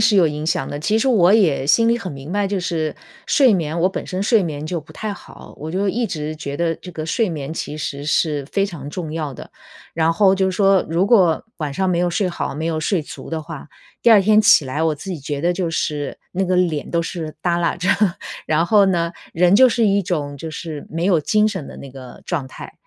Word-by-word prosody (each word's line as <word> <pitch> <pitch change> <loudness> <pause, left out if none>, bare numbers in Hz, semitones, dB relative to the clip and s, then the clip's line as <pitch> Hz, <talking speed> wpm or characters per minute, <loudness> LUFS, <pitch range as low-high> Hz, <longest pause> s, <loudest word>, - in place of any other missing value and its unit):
是 215 -1 +4
有 180 - +6
影 150 0 -3
响 155 -4 -1
的。 - - -5
其 215 +7 +1
实 270 - 0
我 195 -7 +5
也 170 -11 +3
心 230 +11 +4
里 235 - +3
很 190 -9 -6
明 140 +4 -8
白， 205 -1 0
就 200 - -1
是 165 -4 -2 0.3
睡 260 -7 +4
眠 165 -1 -2
我 180 - +3
本 190 - -5
身 185 0 -4
睡 210 0 +3
眠 155 -2 -4
就 170 -1 -3
不 155 - -16
太 215 -1 -4
好， - - -13
我 155 +2 -6
就 195 +4 0
一 235 +5 0
直 155 -6 -4
觉 140 -2 -6
得 170 -1 0
这 180 - -11
个 160 -2 -6
睡 215 +5 +1
眠 155 -1 -5
其 150 - -5
实 145 -2 -5
是 150 -2 0
非 195 0 +1
常 145 -7 -8
重 160 -1 -5
要 155 -3 -3
的。 - - -10 0.5
然 165 0 +2
后 190 +2 +4
就 190 0 +1
说 195 0 +3
如 170 +4 +1
果 185 -8 +4
晚 150 -4 -3
上 190 +4 0
没 180 - +1
有 175 0 +1
睡 185 +1 0
好、 170 -4 -4
没 160 +1 -3
有 160 -1 -1
睡 185 +2 0
足 155 - -10
的 160 - -2
话， 155 -2 -9 0.3
第 235 - +5
2 215 - +8
天 215 +2 +5
起 215 -8 +6
来 135 +4 -3
我 160 -1 +2
自 190 +6 -6
己 165 - -6
觉 145 0 -4
得 175 +3 +1
就 175 -2 -2
是 150 -3 -3
那 190 +1 0
个 185 0 +1
脸 165 -5 0
都 170 - +1
是 165 -2 -5
搭 175 0 0
拉 170 -1 0
着， 180 +1 -2 0.6
然 160 +2 +2
后 205 +1 +5
呢， 170 -2 0 0.2
人 180 +3 +4
就 255 +4 +7
是 230 -2 +2
一 200 0 +2
种 145 -6 -3
就 160 +3 -7
是 155 -1 -6
没 165 +2 -2
有 180 -5 +3
精 215 +7 +2
神 190 -8 -3
的 - - -10
那 140 - -9
个 130 -1 -11
状 130 -1 -2
态， - - -10
170 Hz, 265 characters per minute, -20 LUFS, 155-195 Hz, 0.6 s, 2